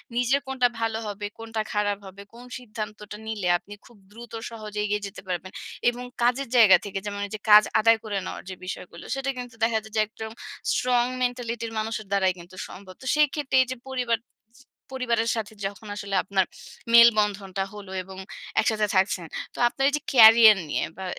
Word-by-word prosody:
নিজের 250 +3 +2
কোনটা 260 -2 +2
ভালো 225 -1 -1
হবে, 205 0 -5
কোনটা 225 -1 -3
খারাপ 205 -1 0
হবে, 195 +1 -11
কোন 240 +1 -12 0.2
সিদ্ধান্তটা 210 -2 -7
নিলে 210 -5 -2
আপনি 205 +3 -13
খুব 240 -3 -18
দ্রুত 235 +1 -12 0.2
সহজে 215 -2 -7
এগিয়ে 210 0 -1
যেতে 195 - -10
পারবেন। 185 +1 -4 0.4
এবং 245 +1 -6 0.2
কাজের 250 +3 +2
জায়গা 220 -6 +8
থেকে 195 -1 -4
যেমন 205 -1 -4
ঐযে 210 +1 -7
কাজ 210 0 +10 0.2
আদায় 225 +1 +5
করে 205 -2 -3
নেওয়ার - - -6
যে 185 - -6
বিষয়গুলো 175 -2 -7
সেটা 270 0 -2
কিন্তু 245 -2 -7
দেখা 225 -1 +3
যায় 220 0 -14
যে 215 - +4
একদম 220 0 -8 0.4
strong 245 -1 +2 0.2
mentality-র 235 -2 -3
মানুষের 215 0 -3
দ্বারাই 190 -2 +2
কিন্তু 175 +2 -13
সম্ভব। 185 -1 -11
তো - - -11
সেক্ষেত্রে 295 -2 +1
এইযে 255 +1 -5
পরিবার 245 -3 0 0.4
ছি 270 - -19 0.3
পরিবারের 235 -3 0
সাথে 220 -1 -4
যখন 200 +2 -6
আসলে 200 -1 -4
আপনার 190 -1 +1 0.5
মেলবন্ধনটা 210 -4 +5
হলো 200 -2 -10
এবং 190 0 -11 0.4
একসাথে 215 -1 +2
থাকছেন। 190 -2 +2 0.3
তো - - -15
আপনার 270 +3 -1
এইযে 290 0 -2
career 225 -3 +9
নিয়ে - - 0
বা 190 - -6
220 Hz, 175 wpm, -25 LUFS, 200-240 Hz, 0.5 s, কাজ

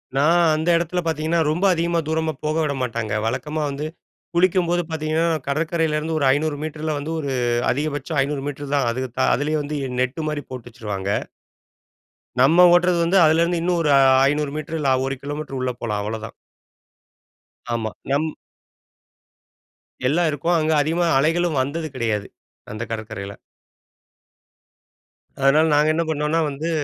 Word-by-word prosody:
நான் 160 +5 +4
அந்த 160 +2 -1
இடத்துல 175 +1 -1
பார்த்தீங்கன்னா, 160 +1 0
ரொம்ப 175 +6 0
அதிகமா 170 0 0
தூரமா 160 0 0
போக 155 0 -1
விட 150 -2 0
மாட்டாங்க. 115 -3 -2
வழக்கமா 135 +7 -2
வந்து 140 +2 -4 0.5
குளிக்கும்போது 175 -1 +2
பார்த்தீங்கணா, 160 +1 0 0.2
கடற்கரையிலிருந்து 160 +1 0
ஒரு 140 - +1
500 150 +1 -1
மீட்டரில 155 0 -3
வந்து 150 +3 -5
ஒரு 140 -3 -3 0.4
அதிகபட்சம் 145 +2 -2
500 140 0 -2
மீட்டர் 145 0 -5
தான். 135 -4 +1
அது 125 +2 -3 0.2
தா - - +2
அதிலேயே 150 +4 -1
வந்து 150 +1 -4 0.3
நெட் 130 +5 -1
மாரி 150 -1 -3
போட்டு 125 -2 -8
வச்சுருவாங்க. 105 -5 -5 1.3
நம்ம 165 +7 +6
ஓட்டுறது 175 0 +4
வந்து 175 +4 +2
அதுலருந்து 170 +2 +2
இன்னும் 175 0 +1
ஒரு 155 - +1
அ - - +6 0.3
500 150 0 -1
மீட்டர் 155 +1 -4
இல்ல 140 -3 +1
1 135 0 -2
கிலோமீட்டர் 145 -1 -5
உள்ள 130 0 -1
போலாம் 105 -3 -2
அவ்ளோதான். 110 +1 -5 1.4
ஆமா, 110 -2 -2 0.2
நம், 145 +3 +1 1.8
எல்லாம் 165 +4 +2
இருக்கும். 160 +4 0
அங்க 155 0 +1
அதிகமா 165 +4 +1
அலைகளும் 165 +1 +1
வந்தது 155 +5 -3
கிடையாது, 110 -5 -1 0.4
அந்த 110 +2 -5
கடற்கரையில. 110 -3 -6 2.0
அதனால 135 +4 +4
நாங்க 150 +1 +4
என்ன 165 - +1
பண்ணோம்னா 150 +1 0
வந்து 145 +4 -4
150 Hz, 140 wpm, -22 LUFS, 135-160 Hz, 2.0 s, நம்ம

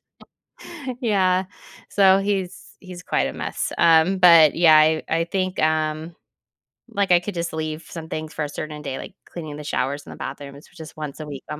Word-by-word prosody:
so - - -63 0.8
yeah, 190 -5 +2 0.4
so 195 -1 +5
he's 195 -2 -3
he's 180 -2 -10
quite - - 0
a - - -6
mess. - - -4
Um, 165 +3 +4
but, 165 -5 +7
yeah, 165 -2 +6
I 155 +1 +3
I 165 +1 +1
think, 185 +1 -2
um, 155 +1 -1 0.7
like, 200 -2 -1
I 175 - +7
could 205 +3 -5
just 170 -1 -3
leave 155 0 -4
some 160 -2 -8
things 155 0 -5
for 155 - -3
a 145 - -6
certain 150 0 -6
day, 130 - -5
like - - -9
cleaning 155 -4 -8
the 150 - -8
showers 145 0 -2
and - - -11
the - - -13
bathrooms, 140 0 -8
which - - -18
is 155 - -11
once 150 -2 -6
a - - -6
week 140 -3 -8
on 150 - -5
160 Hz, 200 wpm, -22 LUFS, 155-185 Hz, 0.8 s, but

